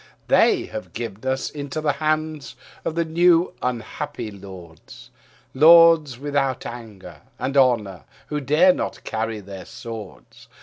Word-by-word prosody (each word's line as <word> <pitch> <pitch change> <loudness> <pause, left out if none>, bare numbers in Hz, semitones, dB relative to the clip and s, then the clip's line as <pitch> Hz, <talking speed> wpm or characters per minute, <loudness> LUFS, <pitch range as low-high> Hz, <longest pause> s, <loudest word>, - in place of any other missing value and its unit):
They - - +4
have 110 - -8
given 115 +2 -5
us 130 0 -2
into 145 0 -5
the 155 -1 +1
hand 155 -3 -2 0.3
of 160 - -4
new 170 +1 +3
unhappy 125 0 -4
lords, 95 -5 -13 0.4
Lords 160 -2 +6
without 135 -1 -2
anger 100 -9 -10 0.2
and 135 - -3
honour, 115 -9 +2 0.2
who 150 -1 -4
dare 150 - +4
not 300 +2 -5
carry 110 -1 -3
their 95 -1 -10
swords. 110 -5 -10
130 Hz, 125 wpm, -22 LUFS, 110-155 Hz, 0.4 s, Lords